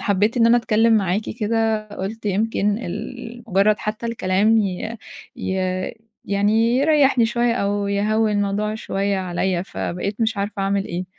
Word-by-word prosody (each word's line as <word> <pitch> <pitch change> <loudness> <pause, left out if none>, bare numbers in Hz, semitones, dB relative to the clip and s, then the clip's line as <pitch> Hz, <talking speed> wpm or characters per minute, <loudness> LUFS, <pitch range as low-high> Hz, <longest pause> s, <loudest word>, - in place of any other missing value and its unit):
حبّيت 205 +4 +1
إن 230 -1 +5
أنا 235 +1 +6
أتكلّم 225 0 +3
معاكِ 195 +1 0 0.2
كده، 220 0 0
قُلت 205 +2 -6
يمكن 205 +1 0
ال 240 +3 -7
مجرّد 200 +3 +3
حتّى 215 +2 -4
الكلام 215 0 +2
ي 205 +3 -2 0.4
ي 190 - -3 0.7
يعني 215 +4 +2
يريحني 280 -5 +4
شوية، 235 +1 +1
أو 200 -2 -1
يهوّن 210 +1 +1
موضوع 210 +2 -1
شوية 200 -2 -1
عليّا. 180 -1 -1
فبقيت 195 +3 -4
مش 220 -1 0
عارفة 200 0 -3
أعمل 195 0 0
إيه. 175 +1 -4
210 Hz, 145 wpm, -21 LUFS, 200-225 Hz, 0.7 s, أنا